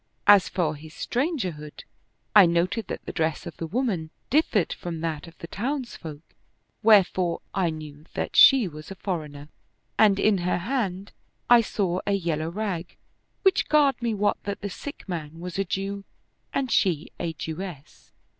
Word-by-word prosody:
As 205 Hz, -2 st, +7 dB
for 165 Hz, -4 st, 0 dB
his 155 Hz, +1 st, -12 dB
strangerhood, 205 Hz, -, -3 dB, 0.5 s
I 200 Hz, -4 st, +9 dB
noted 175 Hz, +6 st, 0 dB
that -, -, -6 dB
the -, -, -4 dB
dress 160 Hz, 0 st, -1 dB
of 170 Hz, -, -8 dB
the 165 Hz, -, -4 dB
woman 195 Hz, -6 st, -1 dB, 0.2 s
differed 245 Hz, -, +2 dB
from 165 Hz, -2 st, -6 dB
that 160 Hz, -2 st, -3 dB
of 165 Hz, -, -15 dB
the -, -, -8 dB
townsfolk, 205 Hz, -, -5 dB, 0.6 s
wherefore 190 Hz, -5 st, +4 dB
I 190 Hz, -4 st, +1 dB
knew 155 Hz, -1 st, -8 dB
that -, -, -3 dB
she 265 Hz, -7 st, +8 dB
was 155 Hz, -2 st, -10 dB
a 195 Hz, -, -7 dB
foreigner; 150 Hz, -7 st, -5 dB, 0.5 s
and 205 Hz, -3 st, +6 dB
in 210 Hz, -2 st, +3 dB
her 175 Hz, 0 st, 0 dB
hand 200 Hz, -2 st, -2 dB, 0.4 s
I 240 Hz, -1 st, +9 dB
saw 190 Hz, -5 st, -1 dB
a 200 Hz, -, +2 dB
yellow 165 Hz, -4 st, -1 dB
rag, 185 Hz, -2 st, -4 dB, 0.5 s
which 385 Hz, -1 st, +3 dB
garred 285 Hz, -5 st, +4 dB
me 230 Hz, -2 st, 0 dB
wot 205 Hz, 0 st, +1 dB
that 200 Hz, 0 st, -4 dB
the 200 Hz, 0 st, -4 dB
sick 285 Hz, +2 st, -8 dB
man 165 Hz, -3 st, -5 dB
was 180 Hz, +2 st, -5 dB
a 195 Hz, -, +1 dB
Jew 195 Hz, +2 st, -3 dB, 0.5 s
and 265 Hz, -3 st, -1 dB
she 170 Hz, -6 st, +1 dB
a 170 Hz, -2 st, -2 dB
Jewess. 160 Hz, -1 st, -8 dB
185 Hz, 165 wpm, -25 LUFS, 160-210 Hz, 0.6 s, I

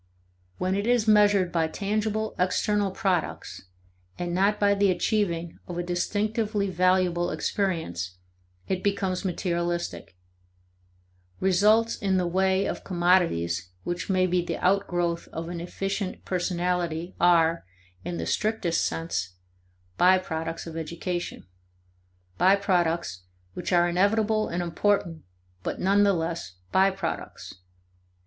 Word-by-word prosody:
When 185 Hz, +1 st, 0 dB
it 200 Hz, +3 st, -1 dB
is 240 Hz, -2 st, +2 dB
measured 205 Hz, -4 st, +4 dB
by 165 Hz, -2 st, +1 dB
tangible 215 Hz, +4 st, -2 dB
external 200 Hz, +2 st, +1 dB
products, 185 Hz, -, -2 dB, 0.5 s
and 175 Hz, -1 st, -3 dB
not 200 Hz, +3 st, +2 dB
by 200 Hz, -1 st, +4 dB
the 200 Hz, 0 st, +3 dB
achieving 175 Hz, -2 st, -1 dB
of 175 Hz, -, -6 dB
a 175 Hz, -, -1 dB
distinctively 205 Hz, +3 st, -1 dB
valuable 180 Hz, -1 st, +2 dB
experience, 155 Hz, -, -2 dB, 0.5 s
it 185 Hz, -1 st, -1 dB
becomes 195 Hz, -2 st, 0 dB
materialistic. 175 Hz, -, -2 dB, 1.2 s
Results 210 Hz, +5 st, +3 dB
in 195 Hz, -2 st, +1 dB
the 180 Hz, -, +1 dB
way 190 Hz, +2 st, +2 dB
of -, -, -4 dB
commodities 170 Hz, -, +1 dB
which 175 Hz, +3 st, -4 dB
may 185 Hz, -1 st, +3 dB
be 180 Hz, -1 st, +1 dB
the -, -, -3 dB
outgrowth 175 Hz, -3 st, 0 dB
of 165 Hz, +1 st, -6 dB
an 175 Hz, -1 st, -5 dB
efficient 195 Hz, +2 st, -4 dB
personality 175 Hz, -1 st, -1 dB
are, 170 Hz, -1 st, +4 dB, 0.4 s
in 175 Hz, 0 st, -4 dB
the -, -, -3 dB
strictest 210 Hz, -6 st, 0 dB
sense, 95 Hz, -, -3 dB, 0.6 s
by 185 Hz, +1 st, +6 dB
products 165 Hz, -2 st, -4 dB
of 165 Hz, -1 st, -8 dB
education: 170 Hz, +2 st, -4 dB, 0.9 s
by 185 Hz, +3 st, +6 dB
products 170 Hz, -, 0 dB, 0.3 s
which -, -, -4 dB
are 175 Hz, -1 st, +4 dB
inevitable 215 Hz, +4 st, +2 dB
and 175 Hz, +1 st, -2 dB
important, 170 Hz, -2 st, 0 dB, 0.4 s
but -, -, -4 dB
nevertheless 180 Hz, -, +1 dB, 0.2 s
by 190 Hz, +1 st, +5 dB
products. 195 Hz, 0 st, -5 dB
180 Hz, 120 wpm, -26 LUFS, 170-200 Hz, 1.2 s, by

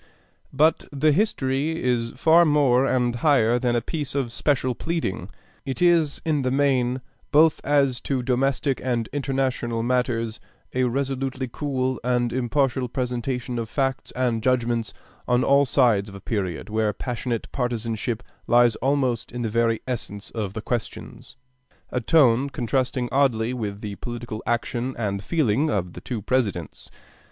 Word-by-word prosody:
But 155 Hz, +4 st, +3 dB
the 150 Hz, +2 st, +2 dB
'History' 150 Hz, -4 st, 0 dB
is 120 Hz, -2 st, 0 dB
far 165 Hz, +2 st, +5 dB
more 140 Hz, -4 st, +3 dB
and 120 Hz, -2 st, +1 dB
higher 120 Hz, -4 st, +3 dB
than 120 Hz, -1 st, +1 dB
a 120 Hz, -, +1 dB
piece 145 Hz, +2 st, -4 dB
of 130 Hz, -4 st, -1 dB
special 130 Hz, 0 st, 0 dB
pleading. 120 Hz, -, -3 dB, 0.3 s
It 135 Hz, -2 st, -4 dB
is 170 Hz, -4 st, +3 dB
in 155 Hz, -3 st, +1 dB
the 130 Hz, -, 0 dB
main, 130 Hz, -2 st, +1 dB, 0.3 s
both 155 Hz, +2 st, +5 dB
as 140 Hz, -4 st, +2 dB
to 130 Hz, -3 st, -1 dB
domestic 135 Hz, +2 st, 0 dB
and 120 Hz, -3 st, -1 dB
international 130 Hz, -4 st, -1 dB
matters, 120 Hz, -2 st, 0 dB, 0.3 s
a 130 Hz, 0 st, +2 dB
resolutely 135 Hz, +1 st, -2 dB
cool 130 Hz, 0 st, -2 dB
and 125 Hz, -1 st, +1 dB
impartial 130 Hz, 0 st, 0 dB
presentation 125 Hz, -1 st, -2 dB
of 115 Hz, -1 st, -4 dB
facts 135 Hz, 0 st, -1 dB
and 120 Hz, -3 st, 0 dB
judgments 120 Hz, -2 st, 0 dB, 0.4 s
on 125 Hz, 0 st, +3 dB
all 140 Hz, +1 st, +4 dB
sides 115 Hz, -7 st, +3 dB
of 100 Hz, -, -11 dB
a -, -, -8 dB
period 95 Hz, -5 st, -3 dB
where 110 Hz, -1 st, 0 dB
passionate 120 Hz, -2 st, -3 dB
partisanship 115 Hz, -2 st, -2 dB, 0.2 s
lies 120 Hz, -1 st, +5 dB
almost 130 Hz, -3 st, 0 dB
in 120 Hz, 0 st, -4 dB
the 115 Hz, -, -1 dB
very 115 Hz, 0 st, +1 dB
essence 105 Hz, -5 st, -5 dB
of 105 Hz, -4 st, -4 dB
the 110 Hz, 0 st, -6 dB
questions 120 Hz, +2 st, -5 dB, 0.6 s
a 125 Hz, -, -1 dB
tone 135 Hz, -2 st, +4 dB
contrasting 125 Hz, 0 st, -1 dB
oddly 125 Hz, -4 st, +2 dB
with 105 Hz, -4 st, -4 dB
the 105 Hz, -2 st, -5 dB
political 120 Hz, -2 st, -6 dB
action 120 Hz, +2 st, -1 dB
and 100 Hz, -3 st, -2 dB
feeling 145 Hz, 0 st, +1 dB
of 90 Hz, -, -1 dB
the -, -, -9 dB
two 115 Hz, -5 st, -5 dB
Presidents. 100 Hz, -11 st, -2 dB
125 Hz, 150 wpm, -24 LUFS, 115-135 Hz, 0.6 s, far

